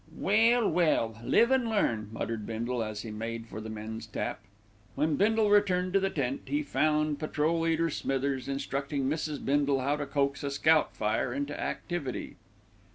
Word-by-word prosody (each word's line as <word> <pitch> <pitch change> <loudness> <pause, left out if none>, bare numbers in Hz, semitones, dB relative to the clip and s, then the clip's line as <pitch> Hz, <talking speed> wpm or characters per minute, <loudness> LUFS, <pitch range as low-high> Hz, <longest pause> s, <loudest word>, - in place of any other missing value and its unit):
"Well, 225 +3 +4
well, 115 -10 +1
live 235 - +4
an' 255 -3 +2
learn," 115 - 0
muttered 110 -1 -3
Bindle, 115 +2 -2
as 110 -1 -5
he 110 - -6
made 115 +1 -5
for 110 -1 -8
the 110 - -7
men's 110 +1 -6
tap. 105 - -3 0.6
When 155 0 +1
Bindle 215 +2 +3
returned 185 -3 +3
to 195 - +5
the 195 0 0
tent, 275 +7 -2
he 295 +1 0
found 155 - +1
Patrol 155 +1 0
leader 165 0 +1
Smithers 135 -1 -1
instructing 140 +1 -2
Mrs. 150 0 -2
Bindle 140 0 +2
in - - -3
how 145 +2 +1
to 145 -1 -4
coax 140 0 0
a 140 - -1
scout 155 +3 +3
fire 110 +3 0
into 145 +1 -3
activity. 160 -8 -4
145 Hz, 170 wpm, -29 LUFS, 115-175 Hz, 0.6 s, to